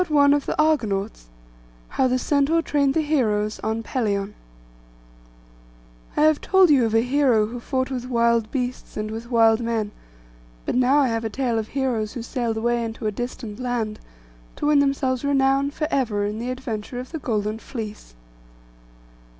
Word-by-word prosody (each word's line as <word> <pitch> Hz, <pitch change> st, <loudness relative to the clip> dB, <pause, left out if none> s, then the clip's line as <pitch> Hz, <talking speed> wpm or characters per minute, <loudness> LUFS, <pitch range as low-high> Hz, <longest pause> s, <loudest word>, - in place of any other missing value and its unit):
STORY 290 Hz, -4 st, +4 dB
II.—THE 290 Hz, +1 st, -1 dB
ARGONAUTS 220 Hz, -, 0 dB
PART -, -, -28 dB
I -, -, -17 dB
HOW 260 Hz, -, +5 dB
THE 255 Hz, 0 st, +1 dB
CENTAUR 290 Hz, +5 st, +2 dB
TRAINED 280 Hz, -3 st, +1 dB
THE 320 Hz, -, +3 dB
HEROES 215 Hz, -9 st, 0 dB
ON 220 Hz, +1 st, -2 dB
PELION 205 Hz, -5 st, -1 dB, 1.8 s
I -, -, +3 dB
have 310 Hz, -1 st, +4 dB
told 380 Hz, -4 st, +5 dB
you 265 Hz, -5 st, +5 dB
of 220 Hz, -, -1 dB
a 225 Hz, -, +5 dB
hero 250 Hz, -3 st, +3 dB
who 240 Hz, +3 st, -6 dB
fought 260 Hz, +2 st, -2 dB
with 250 Hz, -1 st, -4 dB
wild 235 Hz, -2 st, +2 dB
beasts 250 Hz, -1 st, -4 dB
and 215 Hz, 0 st, -3 dB
with 225 Hz, +2 st, -7 dB
wild 225 Hz, -2 st, +4 dB
men; 230 Hz, -3 st, -2 dB, 0.7 s
but -, -, -1 dB
now 255 Hz, +3 st, +3 dB
I 275 Hz, -3 st, +3 dB
have 225 Hz, 0 st, -1 dB
a 225 Hz, -, -2 dB
tale 240 Hz, -1 st, -1 dB
of 220 Hz, -, -4 dB
heroes 235 Hz, -6 st, -1 dB
who 240 Hz, -, -5 dB
sailed 235 Hz, -2 st, -2 dB
away 235 Hz, +1 st, 0 dB
into 225 Hz, 0 st, -5 dB
a 215 Hz, -, +1 dB
distant 235 Hz, -1 st, -6 dB
land, 240 Hz, -4 st, -2 dB, 0.6 s
to -, -, -4 dB
win 295 Hz, -1 st, +4 dB
themselves 275 Hz, -2 st, +1 dB
renown 275 Hz, 0 st, +2 dB
for 305 Hz, +1 st, -3 dB
ever, 215 Hz, -7 st, 0 dB
in 210 Hz, +1 st, -3 dB
the 240 Hz, +2 st, -3 dB
adventure 245 Hz, -2 st, -5 dB
of 255 Hz, -, -8 dB
the 320 Hz, -, -4 dB
Golden 215 Hz, -4 st, -2 dB
Fleece. 215 Hz, -, -8 dB
240 Hz, 175 wpm, -23 LUFS, 215-275 Hz, 1.8 s, HOW